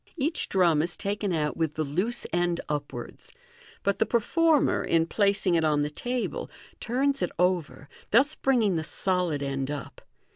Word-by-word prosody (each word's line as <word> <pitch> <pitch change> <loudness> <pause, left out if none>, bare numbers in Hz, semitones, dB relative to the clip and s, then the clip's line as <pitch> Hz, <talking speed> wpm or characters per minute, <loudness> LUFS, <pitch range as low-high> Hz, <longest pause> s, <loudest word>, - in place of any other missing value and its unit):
Each 310 +3 -1
drum 170 -5 +3
is 175 +2 -2
taken 200 0 -2
out 150 -3 0
with 160 -2 -1
the 155 - 0
loose 180 +12 -2
end 175 0 +1
upwards; 145 -1 -5 0.5
but 200 0 0
the - - +3
performer, 310 +6 +2
in 165 -1 +2
placing 200 0 +2
it 165 -1 +3
on 150 -2 +2
the 150 - -3
table, 245 +9 -3 0.3
turns 270 +3 0
it - - +1
over, 170 -7 0 0.2
thus 275 +7 +4
bringing 230 - +2
the 160 - -2
solid 175 -4 0
end 135 -1 -2
up. 145 -1 -6
180 Hz, 160 wpm, -27 LUFS, 155-230 Hz, 0.5 s, thus